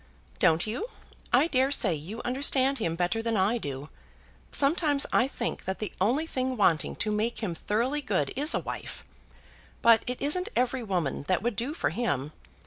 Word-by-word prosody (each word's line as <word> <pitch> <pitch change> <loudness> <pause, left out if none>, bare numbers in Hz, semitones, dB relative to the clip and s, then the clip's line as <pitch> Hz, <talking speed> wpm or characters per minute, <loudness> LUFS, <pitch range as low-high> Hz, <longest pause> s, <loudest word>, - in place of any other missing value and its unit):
"Don't 160 +1 +4
you? 240 - -3 0.4
I - - +5
dare 265 -4 +2
say 220 -10 +2
you 175 +10 -6
understand 270 +1 +2
him 165 -6 -1
better 180 +6 0
than 225 -1 0
I 205 +5 +2
do. 140 -3 -5 0.6
Sometimes 290 0 +3
I 245 - +4
think - - -4
that 190 +1 -2
the 215 -4 -5
only 255 +11 +2
thing 260 -4 -2
wanting 170 -6 +2
to 215 - -1
make 220 +3 -1
him 185 -5 -1
thoroughly 235 - -1
good, 185 - -1
is 295 +5 0
a - - +2
wife. - - -6 0.8
But 230 -1 +7
it 250 0 -3
isn't 360 +8 0
every 250 +1 +1
woman 175 - -2
that 185 +1 +1
would 240 -2 0
do 255 +8 -2
for - - 0
him. 150 - -1
230 Hz, 180 wpm, -28 LUFS, 185-265 Hz, 0.8 s, But